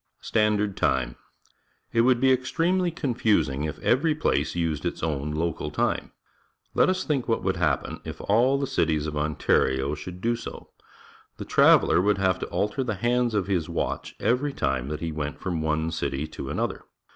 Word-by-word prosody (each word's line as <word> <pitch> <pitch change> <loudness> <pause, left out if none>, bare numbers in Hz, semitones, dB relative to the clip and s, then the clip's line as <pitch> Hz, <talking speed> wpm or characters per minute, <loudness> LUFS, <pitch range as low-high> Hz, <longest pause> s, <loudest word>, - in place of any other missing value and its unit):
Standard 105 -2 +1
Time. 60 -2 0 0.4
— - - -43 0.3
It 115 - +4
would 125 0 +4
be 130 +1 +4
extremely 170 +8 +1
confusing 105 - 0
if 75 - -4
every 150 +5 +2
place 75 - 0
used 80 -4 -1
its - - -3
own 75 -3 -1
local 80 +1 -2
time. - - -1 0.6
Let - - +4
us 185 0 0
think 140 -5 -1
what 115 -4 0
would 95 0 0
happen 75 -5 0
if - - -7
all 120 +7 +3
the 140 - -1
cities 80 - 0
of 75 -1 -4
Ontario 70 -2 +1
should 90 +4 -7
do 115 +4 +1
so. 115 - -9 0.7
The - - -6
traveller - - +5
would 100 +1 +2
have 95 -1 +1
to - - -4
alter 105 +6 -1
the 110 -4 -2
hands 120 +1 +1
of 100 -3 +1
his 90 -5 -1
watch - - -3
every 135 +4 +1
time 65 - -1
that 75 +1 -4
he 85 -1 -2
went 75 -1 -4
from 85 -4 -2
one 80 +1 0
city 75 -3 -2
to - - -7
another. - - -2
95 Hz, 180 wpm, -26 LUFS, 75-120 Hz, 0.7 s, traveller